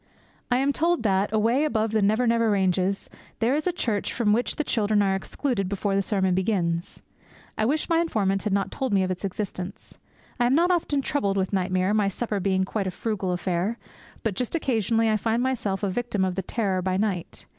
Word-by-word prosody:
I 245 - +3
am 275 +2 +2
told 335 -2 +1
that, 195 -1 +1
away 230 +7 +2
beyond 220 -4 0
the 220 -1 +2
Never 215 +5 +2
Never 230 -1 +3
ranges, 190 -1 +1 0.3
there 235 +3 +2
is 305 +4 0
a - - +3
church 225 -11 -1
from 215 -3 +2
which 240 +3 0
the 305 - -1
children 210 -6 +2
are 195 -1 +2
excluded 195 0 -2
before 200 0 -1
the 195 - +3
sermon 190 -2 +1
begins. 180 -3 -1 0.5
I 215 - 0
wish 295 +6 0
my 330 -1 +3
informant 195 - 0
had 210 - -2
not 195 0 0
told 260 -5 -2
me 195 -1 +3
of 185 - -1
its 185 - -5
existence. 190 -1 -5 0.4
I 240 - +4
am 255 - +3
not 345 +3 +4
often 300 -5 0
troubled 200 -10 0
with 190 +1 -1
nightmare, 185 +1 +1
my 210 -2 +2
supper 205 +1 -2
being 190 0 +1
quite 200 0 -2
a - - 0
frugal 195 -1 -2
affair. 180 +4 -1 0.5
But 225 - 0
just 250 - -2
occasionally 225 - +1
I 215 -1 +3
find 230 +3 0
myself 215 -7 -1
a 200 - +1
victim 210 -3 -1
of 185 - -1
the 190 - -2
terror 190 -1 -1
by 185 0 0
night. 195 -4 -2
210 Hz, 210 wpm, -25 LUFS, 190-235 Hz, 0.5 s, I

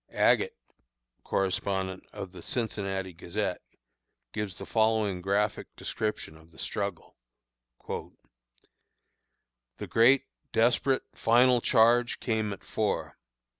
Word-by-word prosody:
"Agate," - - +3 0.7
correspondent 95 0 -1
of 100 -3 -7
The 90 -2 -11
Cincinnati 95 -4 -2
Gazette, 90 +3 -3 0.7
gives 105 -4 -3
the - - -7
following 110 -4 +1
graphic 100 +3 0
description 105 -7 -3
of 80 +1 -18
the 80 - -21
struggle: 100 -1 -4 0.7
"The - - -5 1.7
great, 130 +4 +5 0.3
desperate, 120 +3 +3
final 125 +2 +4
charge 120 +2 +4
came 110 -3 -1
at 100 - -7
four. - - -2
105 Hz, 95 wpm, -29 LUFS, 95-115 Hz, 1.7 s, great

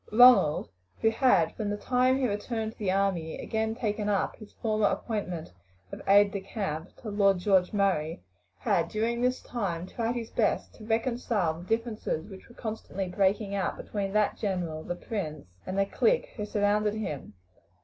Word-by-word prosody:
Ronald, 240 -9 +6 0.3
who 225 - +4
had, 225 - +3
from 210 -2 -2
the 205 - -1
time 255 +3 +2
he 265 -2 +1
returned 220 +1 -2
to - - -22
the 205 -3 -1
army, 185 -4 0
again 220 0 -2
taken 210 -3 -1
up 200 -2 0
his 215 -2 -13
former 215 -2 +1
appointment 180 - -3 0.4
of - - -7
aide 200 +1 +6
de 200 - -3
camp 190 -5 -4
to 220 - -4
Lord 200 -2 +4
George 185 -1 +3
Murray, 175 - 0 0.3
had - - +1
during 230 +2 -1
this 250 +1 +1
time 180 -8 -3
tried 230 +5 -2
his 230 -2 -4
best - - 0
to 215 - -12
reconcile 225 -6 0
the 175 - -11
differences 225 -7 -1
which 190 +3 -12
were 235 - -16
constantly 215 -4 -4
breaking 200 +2 +1
out 195 -2 -1
between 200 -2 -3
that 210 -1 +2
general, 175 -6 -2
the 175 - -3
prince, 160 -8 -5 0.2
and 190 - -3
the 195 - +3
clique - - +1
who 210 - -3
surrounded 210 0 +1
him. 150 - -5
205 Hz, 175 wpm, -29 LUFS, 190-225 Hz, 0.4 s, Ronald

